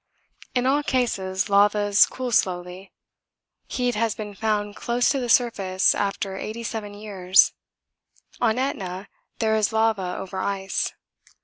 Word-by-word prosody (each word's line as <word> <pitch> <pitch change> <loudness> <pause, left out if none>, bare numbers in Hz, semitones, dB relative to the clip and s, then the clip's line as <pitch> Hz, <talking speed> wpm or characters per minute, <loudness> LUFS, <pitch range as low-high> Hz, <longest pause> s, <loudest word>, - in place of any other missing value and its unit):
In 250 0 +1
all 280 +3 +3
cases 195 -9 -1
lavas 205 0 +4
cool 255 -1 -5
slowly 180 -1 -1 0.8
heat 245 -1 -1
has 225 -1 0
been 210 -1 -6
found 210 0 -1
close 240 0 +1
to 275 - 0
the 245 -2 -3
surface 195 -6 +3
after 195 -1 -2
87 220 -1 -5
years. 195 -3 +3 0.9
On 230 -1 +2
Etna 195 -8 -3 0.3
there 220 -1 +1
is 215 +1 +1
lava 220 -5 +1
over 190 0 -6
ice. 195 -1 -2
210 Hz, 125 wpm, -24 LUFS, 195-230 Hz, 0.9 s, lavas